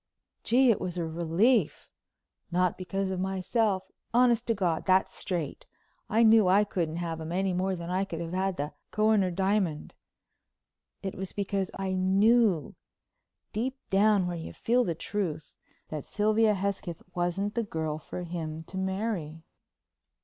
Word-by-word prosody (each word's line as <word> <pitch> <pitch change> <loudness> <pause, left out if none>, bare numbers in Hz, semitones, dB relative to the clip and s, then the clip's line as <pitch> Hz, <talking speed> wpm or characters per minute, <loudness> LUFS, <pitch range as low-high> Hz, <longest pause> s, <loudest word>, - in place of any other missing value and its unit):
Gee, 250 +1 +5
it 220 - 0
was 180 -1 -3
a 170 - -1
relief! 170 - +1 0.6
Not 180 0 +2
because 190 +1 -3
of 185 - -2
myself. 190 +1 0 0.3
Honest 240 -1 +4
to 230 - +2
God, 175 -5 0
that's 185 0 +3
straight. 170 -7 -4 0.4
I 225 +3 +4
knew 220 -3 +6
I 195 +3 +5
couldn't 170 -6 -2
have 165 -1 -3
him 160 +1 -5
any 190 +1 0
more 185 +1 0
than 170 0 -6
I 185 +1 +1
could 170 -4 -6
have 170 0 -5
had 190 0 0
the 145 +1 -3 0.2
Kohinoor 215 -3 +3
diamond. 190 -3 0 1.1
It 190 - -3
was 190 0 -6
because 195 -1 -1
I 190 -1 -2
knew—deep 210 - 0
down 200 -1 +4
where 175 0 -2
you 160 - -7
feel 245 +2 +2
the 170 -7 -2
truth—that 155 -4 -5
Sylvia 215 +1 +2
Hesketh 190 -3 -3
wasn't 180 +4 -1
the 235 - 0
girl 160 -7 -3
for 180 +3 -7
him 160 -2 -5
to 190 +3 -6
marry. 190 -5 -3
190 Hz, 150 wpm, -29 LUFS, 170-210 Hz, 1.1 s, knew